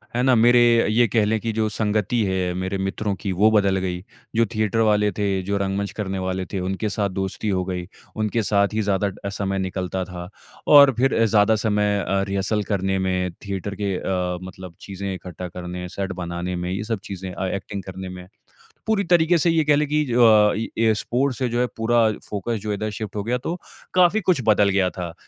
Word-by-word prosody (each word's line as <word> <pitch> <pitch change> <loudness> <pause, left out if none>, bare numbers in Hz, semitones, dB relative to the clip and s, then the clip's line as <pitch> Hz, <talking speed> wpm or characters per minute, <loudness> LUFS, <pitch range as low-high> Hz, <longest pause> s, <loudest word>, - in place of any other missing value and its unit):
है 125 - +1
ना? 130 -1 +4
मेरे 120 +1 +5 0.3
ये 115 +2 +3
कह 110 +1 +2
लें 110 +1 +1
की 115 +1 -2
जो 110 0 0
संगति 110 +2 0
है 95 -2 -1
मेरे 95 +2 -3
मित्रों 95 +2 -2
की 100 - -2
वो 105 +4 +3
बदल 100 -3 +3
गयी, 90 -1 -3 0.3
जो 115 +1 +4
थिएटर 110 +1 0
वाले 105 -2 +3
थे, 100 -1 -1
जो 100 +2 -1
रंगमंच 100 0 -2
करने 95 -2 -4
वाले 95 0 -2
थे 95 - -1
उनके 95 +4 -2
साथ 100 0 -1
दोस्ती 95 +2 -3
हो 95 -2 0
गई। 90 -1 -4 0.3
उनके 110 +2 0
साथ 100 0 +2
ही 110 - 0
ज़्यादा 100 -1 +1 0.2
अ, - - -1
समय 95 -1 -2
निकलता 95 0 -3
था। 90 -1 -8 0.4
और 140 -2 +8
फिर 125 -2 +2
ज़्यादा 110 0 +4
समय 105 -1 +2
अ, 95 0 +1
रिहर्सल 100 +2 -1
करने 95 0 0
में 90 -1 -1
थिएटर 100 0 -4
के 100 -2 0
अ, 90 -1 -2
मतलब 95 -2 -10
चीज़ें 100 0 -5
इकट्ठा 90 -1 -7
करने 90 0 -6
सेट 100 -1 -2
बनाने 85 +1 -4
में 90 0 -3
ये 100 +3 -2
सब 110 -1 -3
चीज़ें 95 -1 -6
अ, 95 - -3
एक्टिंग 100 +1 -5
करने 95 0 -7
में। 90 0 -9 0.6
पूरी 215 -2 +2
तरीके 170 0 +5
से 170 +2 +2
ये 165 -1 +3
कह 150 - +6
लें 150 +1 +1
की 150 +1 +1
ज 125 - -4
अ, 110 -3 +6 0.2
ये 110 -1 +3
स्पोर्ट्स 125 +4 -1
से 130 - +1
जो 120 +1 -1
है 125 - +3
पूरा 115 +1 +1 0.3
फोकस 105 +3 -2
जो 105 - -5
है 105 - 0
इधर 110 +2 -3
शिफ्ट 105 -1 -6
हो 105 - -2
गया 120 +4 0
तो 150 +7 -4 0.4
काफ़ी 185 +4 +4
कुछ 175 -8 +2
बदल 105 -2 +4
गया 95 -2 +2
था। 90 -3 -6
100 Hz, 215 wpm, -22 LUFS, 95-110 Hz, 0.6 s, और